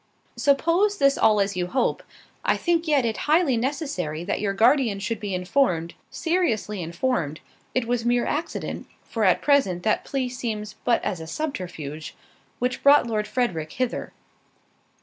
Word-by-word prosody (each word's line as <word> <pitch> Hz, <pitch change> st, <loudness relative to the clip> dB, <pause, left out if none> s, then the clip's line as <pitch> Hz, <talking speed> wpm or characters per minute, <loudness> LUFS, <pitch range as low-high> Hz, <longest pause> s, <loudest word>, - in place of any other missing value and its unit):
"Suppose 335 Hz, +8 st, +2 dB
this 275 Hz, -4 st, +4 dB
all 215 Hz, -1 st, +4 dB
as 200 Hz, -1 st, 0 dB
you 180 Hz, -1 st, -1 dB
hope—I 255 Hz, +7 st, -2 dB
yet -, -, -5 dB
think 340 Hz, -2 st, +1 dB
it 250 Hz, -7 st, +2 dB
highly 305 Hz, -3 st, +3 dB
necessary 230 Hz, -, -2 dB
that 185 Hz, -, -2 dB
your 205 Hz, -2 st, 0 dB
guardian 230 Hz, +1 st, +3 dB
should 225 Hz, +2 st, -3 dB
be 205 Hz, -3 st, -3 dB
informed, 180 Hz, -3 st, +1 dB, 0.2 s
seriously 235 Hz, -, -1 dB
informed, 170 Hz, -, -1 dB, 0.4 s
it 255 Hz, -2 st, +1 dB
was 240 Hz, 0 st, -1 dB
mere 240 Hz, 0 st, +2 dB
accident 325 Hz, +3 st, -3 dB, 0.2 s
(for, 225 Hz, -, -3 dB
at 185 Hz, -, +3 dB
present, 200 Hz, -12 st, +2 dB
that 215 Hz, -, +1 dB
plea 270 Hz, -3 st, -2 dB
seems 225 Hz, -4 st, -4 dB
but 235 Hz, -, +2 dB
as 180 Hz, -, -2 dB
a 160 Hz, -, -7 dB
subterfuge) 160 Hz, -, -5 dB, 0.4 s
which 250 Hz, 0 st, -2 dB
brought 285 Hz, -1 st, +6 dB
Lord 215 Hz, -2 st, -1 dB
Frederick 180 Hz, -12 st, -1 dB
hither." 255 Hz, -2 st, -2 dB
235 Hz, 150 wpm, -24 LUFS, 185-275 Hz, 0.4 s, brought